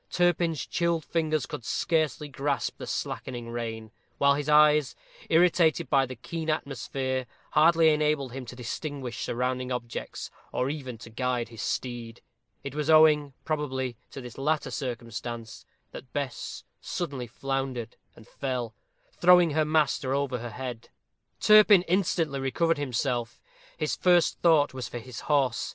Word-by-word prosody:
Turpin's 170 Hz, -4 st, +1 dB
chilled 170 Hz, -2 st, 0 dB
fingers 155 Hz, -4 st, 0 dB
could -, -, -7 dB
scarcely 155 Hz, +2 st, 0 dB
grasp 140 Hz, -1 st, -2 dB
the -, -, -6 dB
slackening 120 Hz, -2 st, -4 dB
rein, 115 Hz, -2 st, -5 dB, 0.3 s
while 140 Hz, 0 st, +5 dB
his 145 Hz, +1 st, -2 dB
eyes, 150 Hz, -2 st, +5 dB, 0.3 s
irritated 165 Hz, -1 st, +3 dB
by 135 Hz, -2 st, +4 dB
the 130 Hz, -, -7 dB
keen 160 Hz, +7 st, -5 dB
atmosphere, 130 Hz, -3 st, -2 dB, 0.2 s
hardly 160 Hz, +1 st, +5 dB
enabled 150 Hz, -3 st, +1 dB
him 135 Hz, +1 st, -6 dB
to 125 Hz, -, -8 dB
distinguish 125 Hz, +1 st, -5 dB
surrounding 125 Hz, +1 st, -2 dB
objects, 120 Hz, -2 st, -5 dB, 0.2 s
or 130 Hz, +2 st, 0 dB
even 130 Hz, -6 st, -6 dB
to 115 Hz, -, -12 dB
guide 125 Hz, 0 st, -1 dB
his 115 Hz, -2 st, -8 dB
steed. 120 Hz, -2 st, -4 dB, 0.4 s
It 140 Hz, -1 st, -6 dB
was 150 Hz, +1 st, -2 dB
owing, 150 Hz, -3 st, +5 dB
probably, 130 Hz, -5 st, -2 dB
to 135 Hz, -, -8 dB
this 125 Hz, +1 st, -10 dB
latter 150 Hz, +3 st, 0 dB
circumstance, 120 Hz, -2 st, -5 dB, 0.3 s
that 125 Hz, -, -10 dB
Bess 140 Hz, -3 st, -4 dB, 0.2 s
suddenly 140 Hz, -8 st, -4 dB
floundered 130 Hz, -1 st, -3 dB, 0.2 s
and 110 Hz, -, -16 dB
fell, 125 Hz, -4 st, -3 dB, 0.4 s
throwing 180 Hz, -2 st, +5 dB
her 155 Hz, +1 st, +2 dB
master 150 Hz, -3 st, +1 dB
over 140 Hz, -3 st, -1 dB
her 120 Hz, +1 st, -6 dB
head. 125 Hz, 0 st, -7 dB, 0.5 s
Turpin 210 Hz, -3 st, +7 dB
instantly 165 Hz, -6 st, 0 dB
recovered 155 Hz, +4 st, +1 dB
himself. 125 Hz, -3 st, -2 dB, 0.4 s
His -, -, -1 dB
first 175 Hz, -2 st, +3 dB
thought 155 Hz, -5 st, +4 dB
was 130 Hz, -3 st, -5 dB
for -, -, -6 dB
his 120 Hz, -1 st, -8 dB
horse. 135 Hz, -5 st, +1 dB
135 Hz, 140 wpm, -27 LUFS, 125-155 Hz, 0.5 s, Turpin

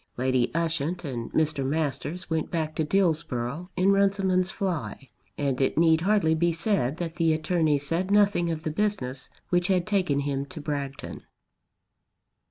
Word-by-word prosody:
Lady 125 Hz, -1 st, +1 dB
Ushant 165 Hz, +1 st, -1 dB
and 120 Hz, -4 st, -5 dB
Mr. 155 Hz, -3 st, +1 dB
Masters 150 Hz, +4 st, -2 dB
went 160 Hz, -2 st, -1 dB
back 160 Hz, -3 st, -2 dB
to 160 Hz, -, 0 dB
Dillsborough 155 Hz, -3 st, 0 dB
in 190 Hz, +2 st, +3 dB
Runciman's 195 Hz, -2 st, +2 dB
fly, 180 Hz, -, -4 dB, 0.3 s
and 140 Hz, -2 st, -1 dB
it 135 Hz, -, +1 dB
need 160 Hz, -1 st, +4 dB
hardly 190 Hz, -4 st, +3 dB
be 170 Hz, +2 st, +2 dB
said 165 Hz, -, 0 dB
that 170 Hz, -2 st, -5 dB
the 165 Hz, -2 st, +3 dB
attorney 155 Hz, -1 st, +1 dB
said 165 Hz, +7 st, -2 dB
nothing 200 Hz, -4 st, +3 dB
of 160 Hz, -1 st, -3 dB
the 155 Hz, -, -2 dB
business 150 Hz, -9 st, -2 dB, 0.2 s
which 175 Hz, 0 st, +2 dB
had 185 Hz, -3 st, +2 dB
taken 185 Hz, -9 st, +1 dB
him 140 Hz, -1 st, -1 dB
to 175 Hz, 0 st, -9 dB
Bragton. 140 Hz, -2 st, -5 dB
160 Hz, 155 wpm, -26 LUFS, 140-180 Hz, 0.3 s, need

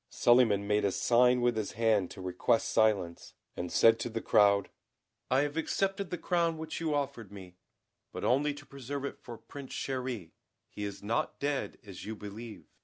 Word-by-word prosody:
Suliman 120 Hz, -5 st, +4 dB
made 105 Hz, +1 st, +1 dB
a 100 Hz, -, +2 dB
sign 125 Hz, +4 st, +3 dB
with 120 Hz, -1 st, +2 dB
his 110 Hz, -2 st, -3 dB
hand 110 Hz, -4 st, +2 dB
to 95 Hz, -, -10 dB
request 95 Hz, +6 st, +1 dB
silence, 100 Hz, -6 st, +1 dB, 0.2 s
and 90 Hz, 0 st, -4 dB
said 115 Hz, 0 st, +5 dB
to 120 Hz, -, -3 dB
the 115 Hz, -, -3 dB
crowd: 100 Hz, -2 st, +3 dB, 0.6 s
"I 130 Hz, +2 st, +4 dB
have 145 Hz, +2 st, -2 dB
accepted 195 Hz, +3 st, -1 dB
the 180 Hz, -, -3 dB
crown 170 Hz, -1 st, 0 dB
which 160 Hz, 0 st, -5 dB
you 155 Hz, -2 st, 0 dB
offered 135 Hz, -8 st, -3 dB
me, 95 Hz, -3 st, -11 dB, 0.5 s
but -, -, -6 dB
only 145 Hz, +3 st, +2 dB
to 145 Hz, 0 st, -12 dB
preserve 140 Hz, 0 st, -6 dB
it -, -, -6 dB
for 120 Hz, -1 st, -9 dB
Prince 140 Hz, +2 st, -10 dB
Chéri; 125 Hz, -10 st, -4 dB, 0.4 s
he 105 Hz, -, -5 dB
is 100 Hz, 0 st, -7 dB
not 110 Hz, +3 st, -1 dB
dead, 140 Hz, -1 st, -2 dB
as 95 Hz, -3 st, -9 dB
you 110 Hz, -, -5 dB
believe. 105 Hz, +2 st, -9 dB
115 Hz, 180 wpm, -31 LUFS, 105-140 Hz, 0.6 s, said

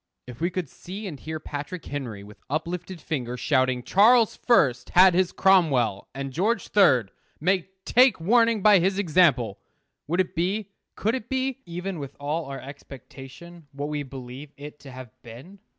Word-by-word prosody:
If 125 Hz, +1 st, -11 dB
we 170 Hz, -, +1 dB
could 185 Hz, -3 st, -4 dB
see 195 Hz, +10 st, -9 dB
and 155 Hz, -8 st, -7 dB
hear 155 Hz, 0 st, -6 dB
Patrick 150 Hz, +4 st, -7 dB
Henry, 120 Hz, -8 st, -6 dB
with 105 Hz, +1 st, -14 dB
uplifted 170 Hz, +4 st, -4 dB
finger, 125 Hz, -7 st, -4 dB
shouting, 130 Hz, -2 st, +1 dB
"Charles 225 Hz, -, +4 dB
First 135 Hz, -, +2 dB
had 185 Hz, 0 st, +8 dB
his 185 Hz, 0 st, +1 dB
Cromwell, 140 Hz, -, +2 dB
and 135 Hz, -1 st, -5 dB
George 205 Hz, -, -1 dB
Third 130 Hz, -, +4 dB, 0.3 s
may 185 Hz, +2 st, 0 dB, 0.2 s
take 250 Hz, -5 st, +4 dB
warning 230 Hz, +3 st, +2 dB
by 210 Hz, -2 st, +7 dB
his 190 Hz, +3 st, 0 dB
example!" 155 Hz, -, +2 dB, 0.5 s
would 175 Hz, +4 st, -1 dB
it 185 Hz, 0 st, 0 dB
be, 190 Hz, +4 st, -2 dB, 0.2 s
could 220 Hz, +3 st, -1 dB
it 240 Hz, -3 st, -5 dB
be, 265 Hz, 0 st, -2 dB
even 180 Hz, +1 st, -5 dB
with 140 Hz, -2 st, -8 dB
all 150 Hz, +3 st, -3 dB
our 135 Hz, 0 st, -7 dB
expectation, 140 Hz, +4 st, -12 dB
what 145 Hz, +1 st, -4 dB
we 150 Hz, -1 st, -3 dB
believe 135 Hz, +1 st, -9 dB
it 150 Hz, +1 st, -10 dB
to 140 Hz, -2 st, -12 dB
have 130 Hz, -2 st, -10 dB
been? 130 Hz, -, -13 dB
160 Hz, 165 wpm, -25 LUFS, 135-190 Hz, 0.5 s, had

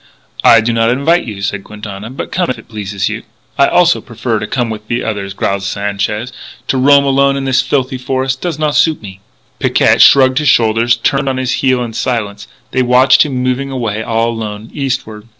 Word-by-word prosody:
"I 115 Hz, -, +6 dB
do 115 Hz, +2 st, -1 dB
not 115 Hz, 0 st, +2 dB
invite 150 Hz, +8 st, +1 dB
you," 100 Hz, -3 st, -7 dB
said 100 Hz, 0 st, -3 dB
Quintana. 105 Hz, 0 st, -8 dB
"But 130 Hz, -, -7 dB
come 180 Hz, -1 st, -1 dB
if 130 Hz, -, -2 dB
it -, -, -15 dB
pleases 100 Hz, -3 st, -3 dB
you." 110 Hz, +1 st, -4 dB, 0.3 s
"I 140 Hz, -, +4 dB
also 175 Hz, -1 st, +3 dB
prefer 115 Hz, -1 st, -3 dB
to 105 Hz, -, -5 dB
come 120 Hz, -3 st, -2 dB
with 110 Hz, -1 st, -6 dB
you 120 Hz, -, -2 dB
others," 100 Hz, -3 st, -4 dB
growled 100 Hz, 0 st, -1 dB
Sanchez. 100 Hz, +4 st, -3 dB, 0.4 s
"To 135 Hz, -, +1 dB
roam 140 Hz, +2 st, +5 dB
alone 140 Hz, 0 st, +2 dB
in 135 Hz, -, -3 dB
this 130 Hz, -1 st, +2 dB
filthy 130 Hz, -2 st, -2 dB
forest 130 Hz, +1 st, -2 dB
does 170 Hz, -4 st, -3 dB
not 150 Hz, -1 st, -1 dB
suit 160 Hz, -2 st, +2 dB
me." 95 Hz, -2 st, -10 dB, 0.4 s
Picquet -, -, +3 dB
shrugged 130 Hz, 0 st, +6 dB
his 150 Hz, -2 st, +2 dB
shoulders, 115 Hz, -1 st, +3 dB
turned 135 Hz, +4 st, 0 dB
on 130 Hz, -, -2 dB
his 130 Hz, -1 st, -2 dB
heel 130 Hz, -2 st, +1 dB
in 115 Hz, -2 st, -6 dB
silence. 105 Hz, -4 st, -3 dB, 0.2 s
They 130 Hz, -, +1 dB
watched 125 Hz, +1 st, +5 dB
him 130 Hz, -3 st, -3 dB
moving 130 Hz, +2 st, -1 dB
away 115 Hz, -5 st, -3 dB
all 115 Hz, +1 st, 0 dB
alone, 110 Hz, -1 st, -6 dB
eastward. 120 Hz, -6 st, -4 dB
120 Hz, 205 wpm, -14 LUFS, 105-135 Hz, 0.4 s, I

